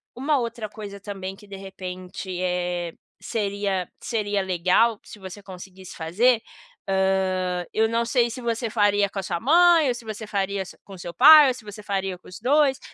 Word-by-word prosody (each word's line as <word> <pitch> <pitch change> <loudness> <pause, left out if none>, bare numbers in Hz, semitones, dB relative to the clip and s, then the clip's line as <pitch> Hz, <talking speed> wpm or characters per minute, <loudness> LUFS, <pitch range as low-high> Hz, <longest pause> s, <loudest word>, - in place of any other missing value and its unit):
uma 280 +2 +1
outra 230 -2 -4
coisa 205 -2 -9
também 195 -1 -6
que 205 0 -17
de 200 - -9
repente, 185 -1 -7
eh, 180 -1 -2 0.3
seria 200 -4 -2
seria 205 -3 -1
legal, 190 +5 +2
se 210 - -12
você 190 +1 -10
conseguisse 190 0 -11
fazer, 220 +9 +2 0.5
hã, 185 -2 0
eu 220 +1 +3
não 230 +1 +1
sei 235 0 +2
se 250 - -7
você 230 0 -2
faria 205 -2 +2
com 195 - -5
a - - -4
sua 175 -2 -3
mãe 335 +2 +5
ou - - +1
se 240 - -9
você 220 0 -6
faria 200 -2 -1 0.2
com 195 - -13
o - - -9
seu 175 0 -7
pai 300 +1 +9
ou - - 0
se 245 -3 -12
você 205 0 -10
faria 195 -2 -2
com - - -20
os 180 - -10
2, 275 +2 +3
200 Hz, 190 wpm, -24 LUFS, 185-230 Hz, 0.5 s, pai